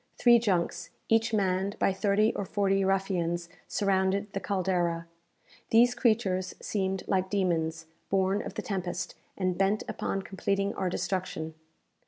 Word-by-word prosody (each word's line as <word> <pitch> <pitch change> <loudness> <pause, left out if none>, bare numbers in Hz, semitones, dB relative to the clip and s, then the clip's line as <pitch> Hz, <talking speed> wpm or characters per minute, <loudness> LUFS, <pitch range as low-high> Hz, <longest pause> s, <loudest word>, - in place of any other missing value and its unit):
Three 240 -1 +6
junks, 190 -7 0 0.2
each 225 0 +3
manned 195 -1 0
by 195 - +2
thirty 205 +3 +2
or - - -2
forty 195 0 +1
ruffians, 180 -3 0 0.2
surrounded 195 +1 +1
the 195 - -1
"Caldera." 180 -4 0 0.6
These 240 +2 +5
creatures 215 -7 +1
seemed 190 -2 -2
like 190 -1 +1
demons, 165 -5 0 0.2
born 195 +1 +2
of - - -7
the - - -3
tempest, 180 -3 -3 0.2
and 185 -2 -1
bent 195 +2 +2
upon 195 - -2
completing 195 +1 -1
our 185 - -1
destruction. 175 -3 -3
195 Hz, 135 wpm, -29 LUFS, 185-200 Hz, 0.6 s, Three